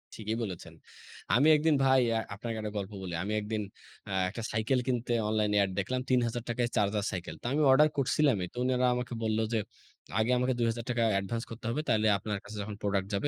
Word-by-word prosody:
ঠিকই 110 Hz, +1 st, -3 dB
বলেছেন। 85 Hz, -5 st, -6 dB, 0.6 s
আমি 140 Hz, +5 st, +5 dB
একদিন 155 Hz, 0 st, +3 dB
ভাই 130 Hz, -1 st, +5 dB, 0.2 s
আ -, -, +1 dB, 0.2 s
আপনাকে 115 Hz, +2 st, -5 dB
একটা 105 Hz, -1 st, -4 dB
গল্প 100 Hz, 0 st, -4 dB
বলি। 90 Hz, -2 st, -5 dB
আমি 105 Hz, -, -2 dB
একদিন 105 Hz, +1 st, -3 dB, 0.5 s
অ্যা 100 Hz, -, -4 dB
এ -, -, +2 dB
একটা 115 Hz, -, -6 dB
সাইকেল 110 Hz, +5 st, +1 dB
কিনতে 120 Hz, -1 st, 0 dB, 0.2 s
অনলাইন 105 Hz, -1 st, +1 dB
এড 100 Hz, -, +1 dB
দেখলাম। 125 Hz, +6 st, -1 dB
৳৩,০০০ 120 Hz, -1 st, 0 dB
চার্জার 105 Hz, 0 st, +1 dB
সাইকেল। 90 Hz, -2 st, -5 dB
তো -, -, -16 dB
আমি 150 Hz, -, +1 dB
অর্ডার 150 Hz, +3 st, +6 dB
করছিলামই। 130 Hz, -7 st, +2 dB
তো -, -, -15 dB
উনারা 125 Hz, 0 st, +2 dB
আমাকে 125 Hz, 0 st, -4 dB
বলল 110 Hz, 0 st, +1 dB
যে, 110 Hz, -, +2 dB, 0.6 s
আগে 110 Hz, +3 st, +2 dB
আমাকে 125 Hz, +1 st, +1 dB
৳২,০০০ 115 Hz, +1 st, 0 dB
অ্যাডভান্স 100 Hz, +4 st, -1 dB
করতে 115 Hz, 0 st, -9 dB
হবে। 135 Hz, +6 st, -1 dB
তাইলে 110 Hz, -2 st, +3 dB
আপনার 105 Hz, +1 st, -3 dB
কাছে 105 Hz, +1 st, -9 dB
যখন 105 Hz, +1 st, -5 dB
প্রোডাক্ট 100 Hz, -1 st, 0 dB
যাবে 100 Hz, +8 st, 0 dB
115 Hz, 200 wpm, -30 LUFS, 105-125 Hz, 0.6 s, অর্ডার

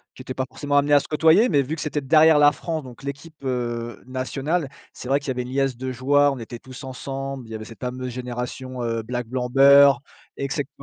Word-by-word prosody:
qui -, -, -11 dB
étaient 130 Hz, -, -6 dB
pas 130 Hz, 0 st, -2 dB
forcément 145 Hz, +1 st, -1 dB
amenées 145 Hz, +1 st, +3 dB
à 145 Hz, -, +8 dB
se -, -, -11 dB
côtoyer, 160 Hz, +9 st, +4 dB
mais 145 Hz, -5 st, +3 dB
vu 140 Hz, +4 st, -3 dB
que 160 Hz, -, -7 dB
c'était 150 Hz, -1 st, -2 dB
derrière 155 Hz, +2 st, +5 dB
la 145 Hz, 0 st, +7 dB
France, 160 Hz, -3 st, -4 dB
donc 130 Hz, +1 st, -12 dB
l'équipe, 140 Hz, +4 st, -7 dB
heu, 120 Hz, -3 st, -3 dB
nationale, 135 Hz, +4 st, -2 dB, 0.2 s
c'est -, -, -9 dB
vrai 140 Hz, +1 st, +3 dB
qu'il 140 Hz, -, -11 dB
y -, -, +2 dB
avait 125 Hz, -, -2 dB
une 125 Hz, -, -9 dB
liesse 135 Hz, -1 st, 0 dB
de 130 Hz, 0 st, -4 dB
joueurs, 145 Hz, +3 st, +3 dB
on 135 Hz, -, -7 dB
était 115 Hz, +1 st, -8 dB
tous 130 Hz, +2 st, -11 dB
ensemble, 135 Hz, -1 st, -6 dB
il -, -, -13 dB
y -, -, -5 dB
avait 110 Hz, 0 st, -7 dB
cette 115 Hz, 0 st, -13 dB
fameuse 125 Hz, 0 st, -4 dB
génération, 125 Hz, +1 st, -5 dB
heu, 115 Hz, -1 st, -1 dB
black, 120 Hz, +1 st, -4 dB
blanc, 125 Hz, 0 st, -3 dB
beurre 140 Hz, +1 st, +7 dB, 0.4 s
et 140 Hz, -, -2 dB
cete 140 Hz, 0 st, -2 dB
130 Hz, 245 wpm, -23 LUFS, 125-145 Hz, 0.4 s, à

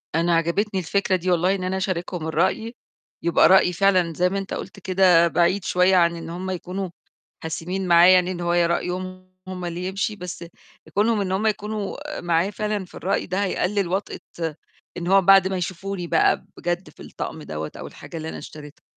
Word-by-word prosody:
أنا 170 Hz, +1 st, +2 dB
عجبِتني 190 Hz, +5 st, 0 dB
الفكرة 190 Hz, +2 st, 0 dB
دي، 180 Hz, +1 st, -1 dB
والله 180 Hz, +3 st, +2 dB
إن 185 Hz, -, -5 dB
أنا 185 Hz, +1 st, -1 dB
أشاركهم 180 Hz, -3 st, -3 dB
الرأي. 190 Hz, +8 st, 0 dB, 0.5 s
يبقى 170 Hz, -, +5 dB
رأيي 185 Hz, -1 st, +5 dB
فعلًا- 185 Hz, -2 st, +2 dB
زي 180 Hz, +1 st, +3 dB
ما 195 Hz, -, -2 dB
أنت 195 Hz, -, -6 dB
قُلت 195 Hz, -, -7 dB
كده- 180 Hz, -2 st, +4 dB
بعيد 180 Hz, +3 st, +2 dB
شوية 180 Hz, +1 st, +3 dB
عن 170 Hz, -1 st, +4 dB
إن 165 Hz, -, -7 dB
هُم 185 Hz, +3 st, -4 dB
يكونوا 185 Hz, +1 st, -4 dB, 0.5 s
حاسمين 180 Hz, +4 st, -3 dB
معايا 175 Hz, +2 st, +7 dB
يعني 180 Hz, 0 st, +3 dB
إن 175 Hz, -, -5 dB
هو 170 Hz, 0 st, 0 dB
رأيهم 185 Hz, +2 st, -1 dB
هُم 180 Hz, -1 st, -5 dB
اللي 175 Hz, +1 st, -4 dB
يمشي. 200 Hz, +2 st, -2 dB
بس 180 Hz, -2 st, -7 dB, 0.5 s
كونهم 210 Hz, +1 st, +2 dB
إن 185 Hz, -1 st, -2 dB
هُم 205 Hz, +4 st, +1 dB
يكونوا 210 Hz, -1 st, -3 dB, 0.2 s
معايا 175 Hz, +2 st, +1 dB
فعلًا 210 Hz, -1 st, -2 dB
في -, -, -17 dB
الرأي 195 Hz, +3 st, -1 dB
ده 190 Hz, +2 st, -1 dB
هيقلل 195 Hz, 0 st, 0 dB
وطأة 190 Hz, +3 st, -3 dB, 0.8 s
إن 175 Hz, 0 st, -4 dB
هو 195 Hz, +1 st, +5 dB
بعد 195 Hz, +1 st, +6 dB
ما 190 Hz, 0 st, -2 dB
يشوفوني 180 Hz, +1 st, -4 dB
بقى 165 Hz, -1 st, +2 dB
بجد 175 Hz, +2 st, -3 dB
في -, -, -14 dB
الطقم -, -, -6 dB
دوّة 75 Hz, 0 st, -5 dB
أو -, -, -7 dB
الحاجة 165 Hz, -, -10 dB
اللي 160 Hz, 0 st, -5 dB
أنا -, -, -6 dB
اشتريتها. 150 Hz, -1 st, -11 dB
185 Hz, 185 wpm, -23 LUFS, 170-195 Hz, 0.8 s, معايا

